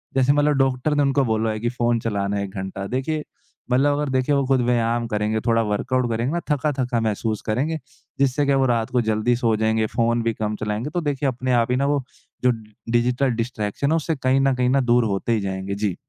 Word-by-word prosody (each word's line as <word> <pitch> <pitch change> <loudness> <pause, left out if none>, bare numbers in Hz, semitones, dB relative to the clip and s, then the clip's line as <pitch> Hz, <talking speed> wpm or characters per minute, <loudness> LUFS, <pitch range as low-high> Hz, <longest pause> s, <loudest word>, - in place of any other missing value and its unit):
जैसे 135 +1 +4
मतलब 145 0 +3
डॉक्टर 135 +2 +1
ने 145 - +3
उनको 140 0 +2
बोला 110 -1 0
है 110 - -4
कि 120 +2 -1
फ़ोन 120 -1 0
चलाना 100 -2 -1
1 100 -1 -5
घंटा, 95 0 -5
देखिए 150 +6 -2 0.5
मतलब 140 +3 +3
अगर 150 -1 -1
देखिए 130 +2 +1
वो 140 -1 +1
ख़ुद 135 -1 +3
व्यायाम 120 -1 +1
करेंगे 105 0 -1
थोड़ा 115 0 +3
वर्कआउट 120 +4 0
करेंगे 115 +5 -1
ना 175 - 0
थका-थका 130 -4 0
महसूस 110 0 -1
करेंगे। 140 +9 0 0.4
जिससे 140 +1 +2
क्या 140 -1 +3
वो 135 - +3
रात 115 -2 0
को 125 - +2
जल्दी 110 +2 +1
सो 115 -2 +1
जाएँगे 110 0 +1
फ़ोन 115 0 +2
भी 115 0 0
कम 105 0 -3
चलाएँगे, 105 +6 -3
तो 175 +3 -2
देखिए 145 -2 -1
अपने 130 0 -3
आप 120 0 +2
ही 125 - +2
ना 140 - +1
वो 145 -2 +1 0.4
जो 125 - +6 0.4
डिजिटल 125 +3 +2
डिस्ट्रैक्शन 115 +4 -2
है - - +3
उससे 160 0 -1
कहीं 130 -1 +1
न 135 -1 +2
कहीं, 125 0 +1
ना 135 +2 +3
दूर 120 -1 +3
होते 100 +2 -1
ही 110 - +1
जाएँगे। 95 0 -3
जी। 100 -3 -1
120 Hz, 225 wpm, -22 LUFS, 110-135 Hz, 0.5 s, जो